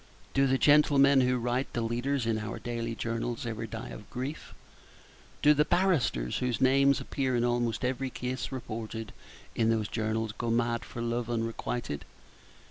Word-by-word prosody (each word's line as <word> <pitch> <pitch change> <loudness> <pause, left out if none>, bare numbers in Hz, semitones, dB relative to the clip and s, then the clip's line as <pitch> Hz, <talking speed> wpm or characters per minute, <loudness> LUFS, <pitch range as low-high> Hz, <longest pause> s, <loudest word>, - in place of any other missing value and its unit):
Do 135 0 +4
the 135 0 +3
gentlemen 140 -1 +5
who 125 0 +2
write 125 +2 -1
the 120 - -1
leaders 120 +3 -1
in 115 -1 0
our 110 +1 -5
daily 115 -1 -3
journals 115 +1 -3
ever 115 -1 -4
die 115 0 -6
of 105 - -10
grief? 135 +4 -6 0.9
Do 150 - +7
the 150 0 +3
barristers 150 - +1
whose 125 -2 -1
names 135 +1 +4
appear 130 -3 -1
in 120 - +2
almost 120 -1 0
every 130 +1 -1
case 125 +2 -4
reported 115 -3 -5 0.4
in 115 -1 +2
those 110 -2 +1
journals 110 0 -1
go 115 +2 -4
mad 115 0 +1
for 115 - -6
love 120 0 -2
unrequited? 115 - -3
120 Hz, 160 wpm, -29 LUFS, 115-130 Hz, 0.9 s, Do